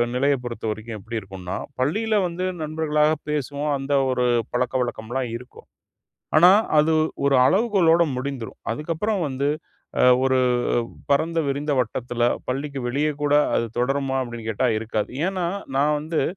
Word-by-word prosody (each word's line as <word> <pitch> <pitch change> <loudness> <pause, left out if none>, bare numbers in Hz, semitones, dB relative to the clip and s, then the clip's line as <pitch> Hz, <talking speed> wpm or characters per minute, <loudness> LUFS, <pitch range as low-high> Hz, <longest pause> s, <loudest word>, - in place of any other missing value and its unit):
நிலைய 140 +2 +3
பொறுத்தவரைக்கும் 110 -2 -5
எப்பிடி 115 +3 -5
இருக்குன்னா, 95 -2 -7 0.2
பள்ளியில 215 +12 +1
வந்து 175 +2 -3 0.2
நண்பர்களாக 155 -1 +1 0.2
பேசுவோம். 145 0 -2
அந்த 135 +1 -3 0.2
ஒரு 125 -1 +1 0.3
பழக்கவழக்கம்லாம் 125 0 -1
இருக்கும். 125 +1 -11 0.7
ஆனா, 175 +3 +8 0.3
அது 160 +2 +3 0.3
ஒரு 140 -1 +4
அளவுகோலோட 180 - +4
முடிந்திரும். 130 -3 -5
அதுக்கப்புறம் 170 - -2
வந்து 140 +1 -1 0.5
அ - - +4 0.2
ஒரு 130 0 +3 0.7
பரந்த 160 +4 +2
விரிந்த 145 +2 -1
வட்டத்தில 120 0 -2 0.2
பள்ளிக்கு 140 +2 -3
வெளியே 145 +5 0
கூட 145 0 +1 0.2
அது 115 - +1
தொடருமா? 135 +1 0
அப்பிடின்னு 120 -2 -6
கேட்டா, 125 +4 +1
இருக்காது. 110 -1 -2 0.2
ஏன்னா, 190 -2 -2 0.3
நான் 150 +2 +3
வந்து 155 0 -1
140 Hz, 130 wpm, -23 LUFS, 120-155 Hz, 0.7 s, ஆனா